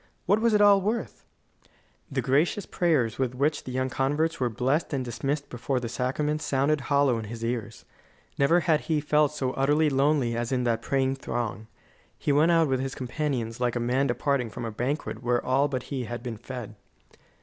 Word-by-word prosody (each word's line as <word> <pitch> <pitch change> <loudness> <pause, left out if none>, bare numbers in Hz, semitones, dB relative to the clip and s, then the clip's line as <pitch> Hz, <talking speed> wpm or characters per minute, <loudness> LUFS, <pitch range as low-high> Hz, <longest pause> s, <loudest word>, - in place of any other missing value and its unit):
What 205 +4 +3
was 230 -2 +3
it 210 - +4
all 200 -1 +6
worth? 215 +5 -3 0.9
The 130 -2 -1
gracious 150 - +1
prayers 145 -11 +1
with 125 -2 -1
which 145 +3 0
the 130 - -5
young 130 0 -1
converts 145 +6 0
were 125 -2 +1
blessed 135 +8 0
and 130 -2 -1
dismissed 140 +4 -2
before 125 +2 -2
the 120 - -4
sacrament 150 +5 -1
sounded 140 0 +1
hollow 140 -3 +2
in 110 - -6
his 115 +2 -6
ears. 115 0 -4 0.5
Never 165 +6 +3
had 160 -4 +2
he 155 -2 +2
felt 150 0 +2
so 135 -4 -2
utterly 145 +3 +2
lonely 135 -3 +2
as 120 +1 -2
in 125 -1 +1
that 115 -2 0
praying 135 +1 0
throng. 110 -5 -4 0.5
He - - -1
went 150 +4 +4
out 165 -2 +4
with 130 -1 0
his 135 +1 -3
companions 125 -3 -3
like 125 -1 0
a - - 0
man 125 +4 +1
departing 125 -1 0
from 115 - -6
a 115 - -4
banquet 125 +1 -3
where 120 0 0
all 135 +3 +3
but 130 -3 -3
he 130 -3 -2
had 120 +1 -6
been 120 -3 -5
fed. 120 -2 -7
135 Hz, 195 wpm, -27 LUFS, 120-150 Hz, 0.9 s, all